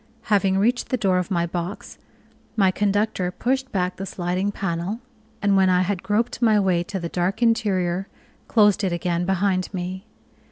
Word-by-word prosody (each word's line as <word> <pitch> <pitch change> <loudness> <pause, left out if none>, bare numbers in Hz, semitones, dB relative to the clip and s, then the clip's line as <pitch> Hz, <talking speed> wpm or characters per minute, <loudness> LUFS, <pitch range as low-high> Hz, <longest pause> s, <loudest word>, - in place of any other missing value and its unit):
Having 195 -1 +3
reached 240 +5 +1
the 255 - +1
door 190 -5 +2
of 180 - -3
my 170 -3 +1
box, 175 +2 -5 0.6
my 195 -4 +4
conductor 205 -1 0
pushed 265 +7 -1
back 180 -1 -1
the 195 - -4
sliding 185 +3 -1
panel, 190 +2 -3 0.4
and 200 -1 +3
when 190 -1 +4
I 180 0 +3
had 190 -1 -2
groped 215 +5 -1
my 220 -3 +4
way 185 -3 +2
to 190 +2 -4
the 170 - -3
dark 185 +7 -1
interior, 195 -5 +1 0.4
closed 210 -4 +4
it 190 - +1
again 175 0 -1
behind 190 -1 +1
me. 185 +2 -5
190 Hz, 170 wpm, -23 LUFS, 180-205 Hz, 0.6 s, my